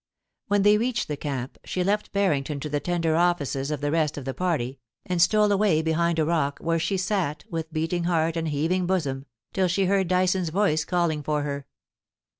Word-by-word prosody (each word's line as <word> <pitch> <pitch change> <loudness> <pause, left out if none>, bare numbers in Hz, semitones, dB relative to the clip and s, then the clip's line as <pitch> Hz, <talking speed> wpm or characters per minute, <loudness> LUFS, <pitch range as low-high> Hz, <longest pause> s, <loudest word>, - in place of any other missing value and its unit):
When 205 -1 +2
they 210 +1 +5
reached 240 0 -1
the 150 - -1
camp, 135 -3 -5
she 180 - -2
left 205 +3 0
Barrington 150 -8 0
to 150 - -4
the 145 0 0
tender 165 -1 0
offices 150 -5 +1
of 150 -2 -3
the 145 0 0
rest 155 -2 +1
of 140 - -6
the 135 - -3
party, 140 -8 -2 0.3
and 180 -2 0
stole 210 +3 +4
away 195 -6 +3
behind 165 +1 +1
a 160 - +2
rock, 155 -4 0
where 165 0 0
she 195 +4 0
sat, 180 -6 -1
with 165 -1 -4
beating 165 +2 -1
heart 165 -1 +1
and 165 -1 -1
heaving 165 +5 0
bosom, 140 -7 -1 0.3
till 190 -1 +2
she 190 +2 +1
heard 190 0 +2
Dyson's 185 -1 +1
voice 160 -3 +1
calling 170 -4 0
for 150 0 -1
her. 140 -1 -4
165 Hz, 200 wpm, -25 LUFS, 150-185 Hz, 0.3 s, they